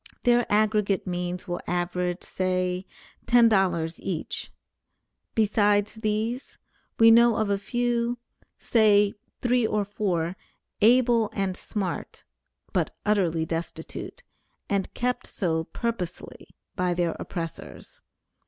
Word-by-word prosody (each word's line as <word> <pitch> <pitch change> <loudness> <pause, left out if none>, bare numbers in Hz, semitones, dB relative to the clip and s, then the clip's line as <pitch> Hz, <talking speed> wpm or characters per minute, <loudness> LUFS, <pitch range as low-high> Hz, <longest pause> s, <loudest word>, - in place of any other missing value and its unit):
Their 240 -1 +3
aggregate 210 -2 +2
means 180 0 -3
will 175 -1 -3
average, 180 0 -1
say, 185 0 -1 0.4
$10 190 -9 +3
each; 175 -5 -4 0.8
besides 205 -1 +3
these, 220 +3 -2 0.4
we 225 0 +8
know 235 0 +6
of 215 -2 0
a 200 - +1
few, 240 +2 0 0.4
say 210 -3 +4 0.3
three 245 -2 +3
or 210 -1 0
four, 185 -4 -1 0.5
able 235 -1 +4
and 195 -2 -1
smart, 195 -2 -5 0.5
but - - -1
utterly 175 -6 +2
destitute, 165 +1 -6 0.4
and 200 -1 -1
kept 250 0 -1
so 160 -5 -1
purposely 185 -2 -5 0.3
by 180 -1 0
their 175 -1 0
oppressors. 165 -3 -7
205 Hz, 105 wpm, -26 LUFS, 180-225 Hz, 0.8 s, we